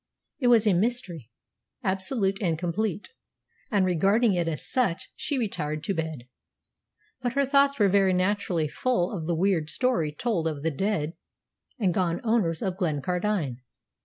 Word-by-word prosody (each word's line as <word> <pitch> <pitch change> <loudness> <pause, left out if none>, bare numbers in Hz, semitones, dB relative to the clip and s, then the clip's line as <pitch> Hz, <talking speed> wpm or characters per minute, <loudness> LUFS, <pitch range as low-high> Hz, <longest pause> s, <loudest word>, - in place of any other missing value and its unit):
It 250 - +1
was 230 -2 +5
a 210 - +4
mystery, 180 - -1 0.5
absolute 195 +1 0
and 170 -5 0
complete; 190 +4 -2 0.6
and, 200 -3 +2
regarding 195 +6 +3
it 175 -2 0
as 155 -2 -3
such, 245 -10 0
she 290 - -2
retired 155 - -2
to 195 - -1
bed. 160 -7 -4 0.9
But 245 -1 -1
her 280 0 +2
thoughts 280 +1 +3
were 205 - +4
very 195 0 +3
naturally 185 -3 0
full 205 - 0
of 160 -4 -5
the 170 - +1
weird 170 -3 +1
story 240 -12 +1
told 170 0 -1
of 150 -3 -4
the 165 - +1
dead 165 -1 -1 0.6
and 195 -8 +1
gone 175 -1 0
owners 215 -9 +1
of 190 -2 -2
Glencardine. 175 - -1
190 Hz, 155 wpm, -26 LUFS, 165-220 Hz, 0.9 s, was